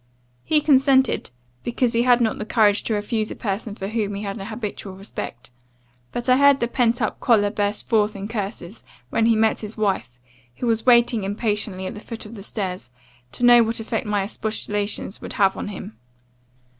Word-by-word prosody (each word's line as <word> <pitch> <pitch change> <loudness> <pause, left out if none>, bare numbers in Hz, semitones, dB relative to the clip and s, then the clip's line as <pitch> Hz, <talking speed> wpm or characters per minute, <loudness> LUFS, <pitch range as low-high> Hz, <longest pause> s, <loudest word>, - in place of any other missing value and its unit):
"He 305 -1 +2
consented, 270 -2 +3 0.3
because 240 0 0
he 230 - +3
had 245 0 +4
not 225 -2 0
the - - -2
courage 215 -2 +3
to 220 - 0
refuse 215 +1 -2
a - - -6
person 205 0 -4
for 195 - -5
whom 210 -2 -2
he 200 - -5
had 200 -1 -4
an 195 -2 -7
habitual 215 -4 -6
respect; 190 - -7 0.6
but 240 - -4
I 255 0 +5
heard 280 0 +5
the 235 - 0
pent 240 -1 +1
up 215 - -2
choler 205 -4 +3
burst 205 0 -2
forth 215 -2 +2
in 200 0 -5
curses, 205 -3 -5 0.3
when 225 - +2
he 230 - +4
met 220 0 +2
his 215 +1 -7
wife, 155 - -1 0.4
who - - -4
was 230 0 0
waiting 235 -3 +5
impatiently 205 -2 -2
at - - -4
the - - -8
foot 225 +1 -8
of 210 - -10
the 210 - -9
stairs, 185 - -4 0.4
to 245 - 0
know 240 0 +8
what 225 0 0
effect 225 -1 -3
my 205 -1 +1
expostulations 210 -1 -3
would - - -7
have 195 -3 +3
on - - -5
him. 195 - -8
215 Hz, 195 wpm, -22 LUFS, 205-235 Hz, 0.6 s, know